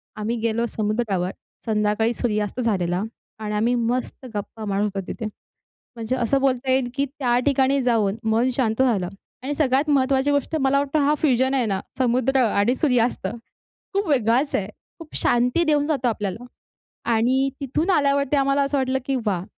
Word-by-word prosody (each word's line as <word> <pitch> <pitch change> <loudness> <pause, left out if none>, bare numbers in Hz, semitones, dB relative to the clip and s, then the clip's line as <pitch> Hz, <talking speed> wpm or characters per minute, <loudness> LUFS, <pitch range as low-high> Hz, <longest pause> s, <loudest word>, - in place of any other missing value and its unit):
आम्ही 215 +2 -2
गेलो 230 +1 0
समुद्रावर, 210 -4 -1 0.3
संध्याकाळी 215 +1 +1
सूर्यास्त 215 -1 -2
झालेला 185 -6 0 0.4
आणि 210 -1 -3
आम्ही 225 +4 +2
मस्त 245 +2 -2
गप्पा 210 +2 -5
मारत 200 0 0
होतो 200 -2 -2
तिथे. 230 - -5 0.7
म्हणजे 230 +2 -2
असं 255 +2 +1
बोलता 260 -1 +1
येईल, 260 -1 +2
की 280 +1 +1
त्या 255 -3 0
ठिकाणी 275 0 +3
जाऊन 220 -5 +1
मन 230 +3 +2
शांत 235 -1 +1
झालं. 210 -9 +1 0.3
आणि 280 +3 -2
सगळ्यात 285 0 +1
महत्त्वाची 270 0 +2
गोष्ट, 285 +2 0
मला 270 +1 +3
वाटतं 285 +2 0
हा 295 - +4
फ्युजन 260 -2 +2
आहे 255 -3 +1
ना, 195 -3 -1 0.2
समुद्र 255 +1 +2
आणि 210 +3 +2
सूर्यास्त, 250 -7 +1 0.7
खूप 400 +1 0
वेगळाच 255 +1 +2
आहे. 195 -2 0 0.3
खूप 325 -3 -12
शांती 245 +8 +2
देऊन 300 -2 +2
जातो 275 -5 0
आपल्याला. 210 0 -3 0.7
आणि 255 +4 +2
तिथून 295 +7 -1
आल्यावरती 280 -3 +2
आम्हाला 275 0 +2
असं 280 +1 0
वाटलं, 265 0 0
की 275 - 0
वाह! 185 -4 0
250 Hz, 160 wpm, -23 LUFS, 220-275 Hz, 0.7 s, हा